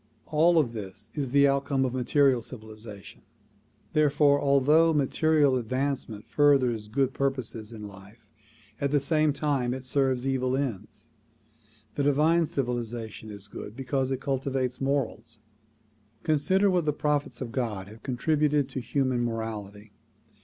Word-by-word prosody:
All 160 Hz, +1 st, +4 dB
this 110 Hz, -6 st, -7 dB
is 140 Hz, -4 st, -3 dB
the 140 Hz, +2 st, +5 dB
outcome 140 Hz, -1 st, +1 dB
of 125 Hz, -, -2 dB
material 130 Hz, 0 st, +3 dB
civilization; 110 Hz, -3 st, -7 dB, 0.7 s
therefore 145 Hz, -1 st, +3 dB
although 150 Hz, +4 st, +4 dB
material 145 Hz, -1 st, +3 dB
advancement 125 Hz, -3 st, -3 dB
furthers 130 Hz, -7 st, +2 dB
good 135 Hz, +4 st, 0 dB
purposes 125 Hz, -5 st, -2 dB
in 105 Hz, -2 st, -8 dB
life, 100 Hz, +3 st, -14 dB, 0.6 s
at 140 Hz, -, +1 dB
the 145 Hz, +1 st, +3 dB
same 155 Hz, +2 st, +2 dB
time 135 Hz, -4 st, -1 dB
it 130 Hz, 0 st, -8 dB
serves 130 Hz, -1 st, +1 dB
evil 130 Hz, -1 st, 0 dB
ends. 130 Hz, -9 st, -5 dB, 0.9 s
The -, -, -2 dB
divine 155 Hz, +4 st, +3 dB
civilization 120 Hz, -5 st, -4 dB
is 100 Hz, -1 st, -8 dB
good 105 Hz, +1 st, -9 dB
because 135 Hz, 0 st, -1 dB
it 135 Hz, -1 st, -2 dB
cultivates 135 Hz, -2 st, -2 dB
morals. 135 Hz, -4 st, -2 dB, 0.9 s
Consider 185 Hz, +6 st, +2 dB
what 175 Hz, -3 st, +1 dB
the 150 Hz, -, +1 dB
prophets 150 Hz, -1 st, -1 dB
of 125 Hz, -3 st, -5 dB
God 110 Hz, -7 st, -3 dB
have 110 Hz, +2 st, -13 dB
contributed 145 Hz, +2 st, +1 dB
to 130 Hz, -, -4 dB
human 130 Hz, 0 st, 0 dB
morality. 110 Hz, -3 st, -5 dB
130 Hz, 130 wpm, -27 LUFS, 115-145 Hz, 0.9 s, the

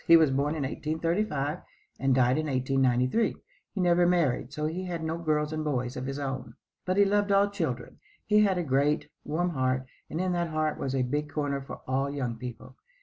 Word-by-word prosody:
He 165 Hz, -, +9 dB
was 160 Hz, -4 st, +4 dB
born 140 Hz, +3 st, +1 dB
in 150 Hz, -, -2 dB
1835 160 Hz, +2 st, -1 dB, 0.4 s
and 135 Hz, -1 st, +3 dB
died 130 Hz, +2 st, +3 dB
in 155 Hz, -, -2 dB
1893. 130 Hz, -, +2 dB, 0.4 s
He 200 Hz, -, -6 dB
never 175 Hz, -1 st, +4 dB
married, 150 Hz, -8 st, +1 dB
so 150 Hz, +2 st, -3 dB
he 175 Hz, +4 st, -2 dB
had 170 Hz, -3 st, -4 dB
no 160 Hz, +1 st, -2 dB
girls 155 Hz, -2 st, 0 dB
and 155 Hz, 0 st, -2 dB
boys 125 Hz, -4 st, -1 dB
of 130 Hz, +1 st, -4 dB
his 135 Hz, 0 st, -3 dB
own. 135 Hz, -4 st, -4 dB, 0.3 s
But 185 Hz, +1 st, 0 dB
he 200 Hz, -, +6 dB
loved 205 Hz, 0 st, +2 dB
all 200 Hz, +1 st, +4 dB
children. 150 Hz, -, -3 dB, 0.3 s
He 210 Hz, 0 st, +4 dB
had 195 Hz, -3 st, +3 dB
a 175 Hz, -, 0 dB
great, 145 Hz, +1 st, +1 dB
warm 175 Hz, +4 st, -1 dB
heart, 130 Hz, -3 st, 0 dB, 0.2 s
and 160 Hz, -, -3 dB
in 185 Hz, 0 st, 0 dB
that 175 Hz, -1 st, 0 dB
heart 155 Hz, -1 st, -1 dB
was 135 Hz, 0 st, -2 dB
a 130 Hz, -, +2 dB
big 145 Hz, +4 st, -1 dB
corner 145 Hz, -2 st, -1 dB
for 135 Hz, -, -9 dB
all 135 Hz, +2 st, 0 dB
young 130 Hz, -5 st, -2 dB
people. 125 Hz, +2 st, -8 dB
150 Hz, 205 wpm, -28 LUFS, 130-170 Hz, 0.4 s, He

